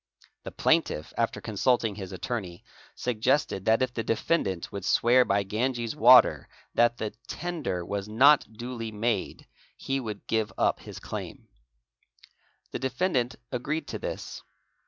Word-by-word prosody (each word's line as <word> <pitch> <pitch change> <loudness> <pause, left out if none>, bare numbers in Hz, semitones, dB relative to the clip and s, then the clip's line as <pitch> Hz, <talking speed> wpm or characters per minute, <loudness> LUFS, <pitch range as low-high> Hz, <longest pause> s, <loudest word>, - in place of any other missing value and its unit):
The - - -8
plaintiff, 75 - +1
after 115 -1 -1
consulting 115 +1 +1
his 95 -2 -7
attorney, 95 -1 -5 0.3
suggested 125 -2 0
that 110 +3 +4
if 125 -1 -2
the 115 - -2
defendant 110 - -1
would 100 - -6
swear 125 +2 +4
by 100 -3 +1
Ganges 115 +4 -2
water 125 -3 +6 0.2
that 120 0 +3
the 110 -1 -3 0.2
tender 155 - -3
was 100 +1 -4
not 135 +2 +5
duly 115 0 -6
made 105 -1 -2 0.3
he 135 0 -2
would 110 -5 -6
give 110 -2 0
up - - +2
his - - -10
claim. - - -7 1.2
The - - -4
defendant 130 -1 0 0.2
agreed 140 +6 -2
to - - -4
this. - - -6
115 Hz, 135 wpm, -27 LUFS, 105-130 Hz, 1.2 s, water